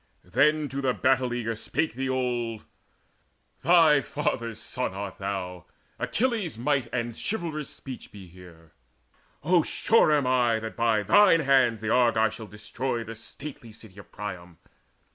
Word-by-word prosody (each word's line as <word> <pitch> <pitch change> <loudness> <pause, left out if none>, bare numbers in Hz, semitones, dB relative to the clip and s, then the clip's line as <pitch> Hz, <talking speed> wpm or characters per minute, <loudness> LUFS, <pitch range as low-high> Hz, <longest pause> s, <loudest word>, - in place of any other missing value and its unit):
Then 150 +11 +2
to 135 +2 -4
the 130 -2 0
battle 130 -1 +2
eager 115 -2 -2
spake 155 +7 -2
the 130 +2 -3
old: 120 -4 -2 1.0
"Thy 160 -3 +5
father's 115 -6 -3
son 125 -7 -4
art 100 -1 -6
thou! 95 -3 -4 0.3
Achilles' 225 - -1
might 130 0 0
And 120 -2 -3
chivalrous 165 -8 -4
speech 130 -2 -10
be 100 -2 -11
here! 85 -2 -16 0.7
O, 175 +2 +4
sure 220 +2 +3
am 145 -3 +3
I 125 -3 +2
That 110 0 -6
by 115 -2 +2
thine 205 - +5
hands 130 -6 +3
the 110 0 -2
Argives 115 -3 +3
shall 110 -1 -9
destroy 115 +4 -4
The 115 - -8
stately 120 +1 -10
city 105 -2 -13
of - - -14
Priam. 90 -4 -7
120 Hz, 145 wpm, -26 LUFS, 110-140 Hz, 1.0 s, Thy